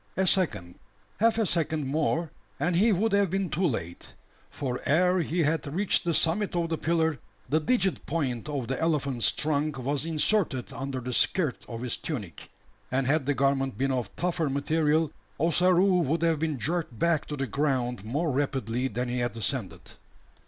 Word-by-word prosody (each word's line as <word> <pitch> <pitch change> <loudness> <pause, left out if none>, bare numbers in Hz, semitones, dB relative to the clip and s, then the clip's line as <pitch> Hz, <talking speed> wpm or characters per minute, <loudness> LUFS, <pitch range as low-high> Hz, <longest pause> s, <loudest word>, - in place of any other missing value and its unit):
A 190 - +2
second 160 - +1 0.4
half 225 +1 +3
a 225 - +2
second 160 -4 0
more 155 +3 0 0.3
and 170 +5 +1
he 215 +6 +4
would 210 +3 +1
have 200 -1 +3
been 190 -2 -1
too 175 +4 +1
late: 85 - -5 0.4
for 125 -3 -4
ere 180 +5 +3
he 170 +1 0
had 155 -1 0
reached 195 +6 +2
the 170 - 0
summit 180 +4 +1
of 170 -1 0
the 160 - -1
pillar, 160 -4 +1 0.3
the 155 - +3
digit 190 +1 +1
point 135 -5 -2
of 140 -5 -3
the 135 - -3
elephant's 140 -7 +1
trunk 150 -1 -1
was 135 +2 -1
inserted 160 - +1
under 135 -1 -4
the 125 +1 -4
skirt 155 -1 +1
of 115 0 -6
his 125 - -1
tunic; 105 - -6 0.4
and 130 +1 +1
had 140 +1 +1
the 145 - +2
garment 135 -1 +1
been 135 +1 0
of 125 -3 -1
tougher 170 -3 -1
material; 155 +2 +1 0.3
Ossaroo 180 +3 +4
would 165 +2 0
have 165 -2 +2
been 155 -3 -1
jerked 155 -1 -2
back 165 +3 +1
to 150 - -5
the 135 - -1
ground 125 -4 -1
more 145 +9 -1
rapidly 130 -3 -1
than 125 +1 -3
he 125 +1 -2
had 120 -1 -2
ascended. 115 -6 -2
150 Hz, 180 wpm, -27 LUFS, 130-170 Hz, 0.4 s, he